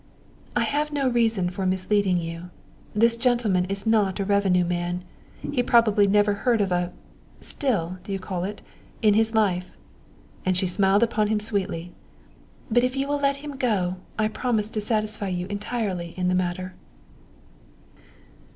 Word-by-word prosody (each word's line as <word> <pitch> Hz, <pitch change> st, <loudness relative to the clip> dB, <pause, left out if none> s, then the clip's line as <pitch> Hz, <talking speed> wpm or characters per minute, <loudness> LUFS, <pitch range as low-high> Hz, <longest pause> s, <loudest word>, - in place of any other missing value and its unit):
"I -, -, +3 dB
have 295 Hz, +1 st, -1 dB
no 280 Hz, -2 st, 0 dB
reason 225 Hz, -7 st, +2 dB
for 190 Hz, +1 st, -4 dB
misleading 190 Hz, 0 st, +1 dB
you. 165 Hz, +1 st, -5 dB, 0.5 s
This 230 Hz, +2 st, +4 dB
gentleman 230 Hz, -7 st, +2 dB
is 195 Hz, +2 st, -4 dB
not 215 Hz, -3 st, +2 dB
a 195 Hz, -, 0 dB
revenue 190 Hz, -3 st, +3 dB
man. 175 Hz, +1 st, -2 dB, 0.5 s
He 265 Hz, -4 st, +1 dB
probably 220 Hz, -4 st, +4 dB
never 205 Hz, +1 st, +3 dB
heard 225 Hz, +3 st, +1 dB
of 195 Hz, -2 st, 0 dB
a 175 Hz, 0 st, 0 dB, 0.5 s
still, 185 Hz, -, -2 dB
do 200 Hz, -, -8 dB
you 195 Hz, -, 0 dB
call 185 Hz, -2 st, -4 dB
it? 205 Hz, +2 st, -5 dB, 0.4 s
in 210 Hz, -1 st, +6 dB
his 220 Hz, +1 st, +2 dB
life 185 Hz, -4 st, 0 dB, 0.3 s
" -, -, -28 dB
and 185 Hz, -1 st, +1 dB
she 185 Hz, -, +2 dB
smiled 195 Hz, +3 st, +3 dB
upon 215 Hz, -2 st, +1 dB
him 215 Hz, 0 st, +1 dB
sweetly. 190 Hz, -5 st, -2 dB, 0.8 s
"But 240 Hz, +2 st, +4 dB
if 255 Hz, +1 st, 0 dB
you 270 Hz, +1 st, -1 dB
will 290 Hz, 0 st, 0 dB
let 280 Hz, 0 st, +2 dB
him 285 Hz, -2 st, -6 dB
go 195 Hz, -8 st, 0 dB, 0.2 s
I 215 Hz, 0 st, +2 dB
promise 220 Hz, -1 st, -1 dB
to 215 Hz, -, -2 dB
satisfy 215 Hz, -1 st, -1 dB
you 180 Hz, -1 st, -2 dB
entirely 200 Hz, -5 st, -3 dB
in 180 Hz, 0 st, +1 dB
the -, -, +1 dB
matter." 185 Hz, 0 st, -2 dB
205 Hz, 165 wpm, -25 LUFS, 185-225 Hz, 0.8 s, in